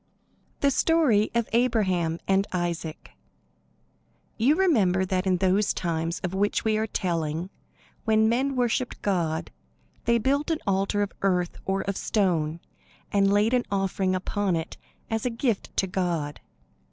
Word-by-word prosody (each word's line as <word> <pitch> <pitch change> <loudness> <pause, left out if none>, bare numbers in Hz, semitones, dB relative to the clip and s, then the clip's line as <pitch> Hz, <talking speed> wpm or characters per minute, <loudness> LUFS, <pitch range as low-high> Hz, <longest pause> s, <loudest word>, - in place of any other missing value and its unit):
THE 280 - +4
STORY 270 -8 +3
OF 235 -1 +1
ABRAHAM 190 -9 +1
AND 195 +1 +2
ISAAC 170 -3 -3 1.2
You 260 +7 +3
remember 205 - +3
that 185 0 -1
in 185 -1 +3
those 190 +3 +2
times 165 -1 -2
of 180 0 -2
which 205 +3 0
we 220 -1 +2
are 220 +1 0
telling, 170 -2 -2 0.5
when 220 -1 +3
men 260 +4 +1
worshipped 250 0 0
God, 170 -5 -1 0.5
they 235 0 +4
built 280 +6 0
an 325 - +1
altar 195 +1 +1
of 200 - -5
earth 180 -3 +1
or 195 0 0
of 200 -1 -3
stone, 170 -6 0 0.5
and 200 -1 +3
laid 210 +4 +3
an 250 -1 +2
offering 195 -1 0
upon 190 0 -1
it 160 0 -4 0.4
as 225 -1 -1
a 250 - +1
gift 230 -2 -2
to - - +3
God. 175 -6 -2
195 Hz, 145 wpm, -26 LUFS, 180-225 Hz, 1.2 s, THE